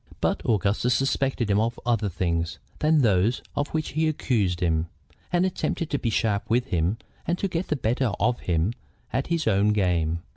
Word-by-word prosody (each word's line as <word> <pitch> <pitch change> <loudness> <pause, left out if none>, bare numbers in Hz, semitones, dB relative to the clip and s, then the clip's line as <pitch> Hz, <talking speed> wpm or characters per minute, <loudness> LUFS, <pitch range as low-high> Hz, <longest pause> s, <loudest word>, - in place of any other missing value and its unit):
But - - 0
Augustus 110 +3 +2
suspected 135 -4 0
him 100 - +3
of 115 +1 -1
other 115 -4 +1
things 85 -2 -1 0.2
than 155 -2 +3
those 105 +2 +2
of 145 - 0
which 155 -1 -2
he 160 +1 +1
accused 110 - 0
him, 80 -2 +1 0.4
and 175 +1 +3
attempted 170 -3 -2
to 145 - 0
be 120 - -1
sharp 105 -2 0
with 120 +2 +2
him 90 +5 +1 0.3
and 175 - +1
to 195 - -1
get 175 0 -2
the 155 - 0
better 120 -1 0
of 120 +3 +1
him 85 +5 0 0.4
at 135 - 0
his 165 -2 0
own 100 0 +3
game. 85 -5 +1
115 Hz, 185 wpm, -25 LUFS, 95-140 Hz, 0.4 s, him